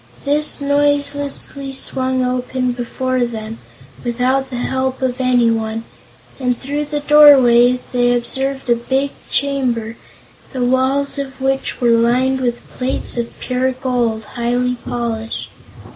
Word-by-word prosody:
This 295 +2 +2
noiselessly 285 -1 0
swung 260 -1 0
open 250 0 -1
before 255 +1 -2
them, 225 -1 -5 0.4
without 255 +3 0
the 255 - -6
help 260 +1 -2
of 255 0 -1
anyone, 230 -3 +1 0.6
and 250 -2 0
through 290 +2 -3
the 295 0 -3
doorway 260 -5 +6
they 245 -1 +2
observed 265 +3 -3
a - - +5
big 265 +4 -1 0.2
chamber, 250 -5 -1 0.6
the 255 -2 -1
walls 265 +3 +1
of 270 -1 -6
which 270 0 -1
were 240 -2 +3
lined 250 +3 +2
with 240 -1 -2
plates 255 +1 -3
of 235 -1 -4
pure 255 +1 -1
gold, 245 -4 -1
highly 245 +2 -1
polished. 230 -2 -4
255 Hz, 125 wpm, -18 LUFS, 240-270 Hz, 0.6 s, doorway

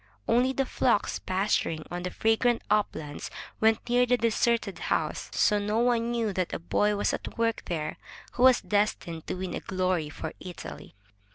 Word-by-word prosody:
Only 250 +2 +3
the 270 0 0
flocks - - +1
pasturing 185 -4 0
on 175 0 -3
the 180 - -3
fragrant 225 +4 +2
uplands 160 -8 -1 0.3
went 220 0 +2
near 245 +1 +3
the 250 +1 +3
deserted 230 -2 +1
house, - - -1
so 210 -1 +3
no 210 +2 -1
one 235 -1 +2
knew 230 -3 0
that 185 -2 -2
a - - -1
boy 205 +5 +1
was 205 - 0
at - - -5
work 230 0 +1
there 155 -3 -3 0.3
who - - -5
was 255 -1 +7
destined 205 -6 -1
to - - -2
win 185 0 -4
glory 185 -5 0
for - - -6
Italy. 180 -9 -9
210 Hz, 170 wpm, -28 LUFS, 185-235 Hz, 0.3 s, was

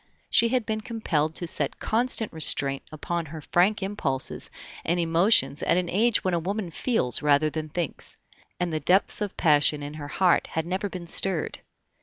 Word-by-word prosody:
She 230 - +4
had 250 -2 0
been 215 0 -2
compelled 160 -10 -2
to 175 - -3
set 150 -4 -1
constant 225 -2 0
restraint 140 -3 +4
upon 165 +2 -4
her 160 +2 -8
frank 185 +7 +1
impulses 190 -10 -1 0.3
and 170 +2 0
emotions 170 -1 +3
at - - +2
an 180 -1 -1
age 225 +4 +2
when 185 - 0
a 170 - +1
woman 190 +1 -4
feels 155 - 0
rather 150 +1 +3
than 155 0 -5
thinks, 165 0 -4 0.4
and 175 -2 -2
the 155 - 0
depths 190 +6 +2
of 205 -2 -4
passion 150 -1 +3
in 145 +1 -6
her 150 -1 -7
heart 180 +4 +2
had 160 0 -3
never 190 +3 -2
been 180 -2 -7
stirred. 175 0 -1
175 Hz, 180 wpm, -25 LUFS, 155-200 Hz, 0.4 s, She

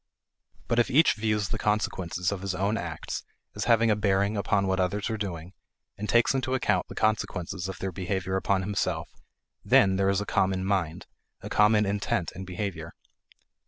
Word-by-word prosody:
But 115 - +1
if 120 - +3
each 150 +5 +5
views 105 -2 -1
the - - -2
consequences 95 -4 -1
of 100 -2 -4
his 95 -1 -2
own 100 +4 0
acts 85 -8 -5 0.3
as 105 - -3
having 115 -1 +4
a - - +3
bearing 100 0 +1
upon 100 -1 +1
what 95 0 0
others 100 +4 -1
are - - -1
doing 90 -4 -5 0.4
and 105 +1 -5
takes 120 +2 +4
into 130 -1 0
account 130 - +1
the - - -10
consequences 95 -3 -1
of 95 - -6
their 95 - -3
behavior 95 0 -2
upon 95 0 +1
himself, 100 0 -2 0.5
then 95 -1 +4
there 95 0 +2
is 100 0 +2
a 105 - -3
common 95 -1 +1
mind; 90 -4 -1 0.4
a - - -7
common 105 0 +4
intent 100 -4 -1
in 95 +2 -7
behavior. 95 +1 -5
100 Hz, 180 wpm, -27 LUFS, 95-105 Hz, 0.5 s, each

